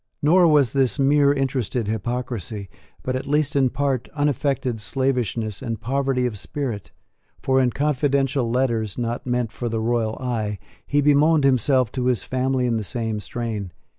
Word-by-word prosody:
Nor 175 Hz, +4 st, +5 dB
was 145 Hz, -7 st, +4 dB
this 135 Hz, -1 st, +2 dB
mere 140 Hz, 0 st, +4 dB
interested 130 Hz, -5 st, -1 dB
hypocrisy, 110 Hz, -2 st, -3 dB, 0.3 s
but, 130 Hz, -, -2 dB
at 130 Hz, +1 st, -4 dB
least 150 Hz, 0 st, +1 dB
in 135 Hz, -2 st, +3 dB
part, 135 Hz, -2 st, -1 dB
unaffected 140 Hz, -5 st, 0 dB
slavishness 120 Hz, -4 st, -1 dB
and 115 Hz, -4 st, -4 dB
poverty 135 Hz, +2 st, 0 dB
of 110 Hz, -5 st, -3 dB
spirit; 120 Hz, -3 st, -4 dB, 0.5 s
for 130 Hz, 0 st, +2 dB
in 125 Hz, -, +3 dB
confidential 140 Hz, -2 st, 0 dB
letters, 115 Hz, -4 st, 0 dB
not 120 Hz, +1 st, -3 dB
meant 125 Hz, -2 st, 0 dB
for 120 Hz, +1 st, -4 dB
the 115 Hz, 0 st, -2 dB
royal 115 Hz, -1 st, 0 dB
eye, 110 Hz, -5 st, -2 dB, 0.3 s
he 145 Hz, 0 st, +2 dB
bemoaned 150 Hz, +2 st, +4 dB
himself 130 Hz, -2 st, +3 dB
to 125 Hz, -1 st, -2 dB
his 125 Hz, -6 st, +1 dB
family 130 Hz, 0 st, 0 dB
in 120 Hz, -2 st, +1 dB
the 110 Hz, -, -2 dB
same 110 Hz, 0 st, -2 dB
strain. 105 Hz, -5 st, -4 dB
125 Hz, 160 wpm, -23 LUFS, 115-140 Hz, 0.5 s, Nor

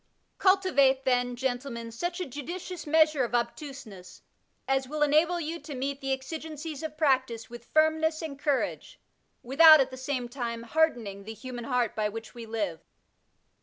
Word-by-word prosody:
Cultivate, 280 Hz, -9 st, +3 dB
then, 245 Hz, -1 st, +1 dB
gentlemen, 245 Hz, -2 st, -3 dB
such 350 Hz, +10 st, -3 dB
a 365 Hz, -, -2 dB
judicious 335 Hz, +6 st, -7 dB
measure 310 Hz, -2 st, +4 dB
of 240 Hz, 0 st, -2 dB
obtuseness 240 Hz, -6 st, -5 dB, 0.4 s
as 270 Hz, -1 st, +1 dB
will 300 Hz, +2 st, 0 dB
enable 315 Hz, +4 st, +3 dB
you 330 Hz, +1 st, -4 dB
to 295 Hz, -4 st, -8 dB
meet 275 Hz, +2 st, -3 dB
the 270 Hz, 0 st, -2 dB
exigencies 305 Hz, +2 st, -5 dB
of 310 Hz, -1 st, -6 dB
practice 260 Hz, -7 st, +1 dB
with 240 Hz, 0 st, -10 dB
finnness 315 Hz, +1 st, +2 dB
and 280 Hz, -3 st, -6 dB
courage, 290 Hz, -2 st, -2 dB, 0.4 s
without, 310 Hz, +5 st, +8 dB
at 265 Hz, -1 st, +1 dB
the 260 Hz, -, -8 dB
same 260 Hz, -1 st, -3 dB
time, 235 Hz, -2 st, -4 dB
hardening 235 Hz, -7 st, 0 dB
^' -, -, -15 dB
the 220 Hz, +1 st, -7 dB
human 245 Hz, -1 st, -7 dB
heart 245 Hz, -3 st, 0 dB
by 215 Hz, -1 st, 0 dB
which 225 Hz, +2 st, -8 dB
we 235 Hz, -2 st, -9 dB
live.'' 205 Hz, -8 st, -3 dB
270 Hz, 165 wpm, -28 LUFS, 240-310 Hz, 0.4 s, without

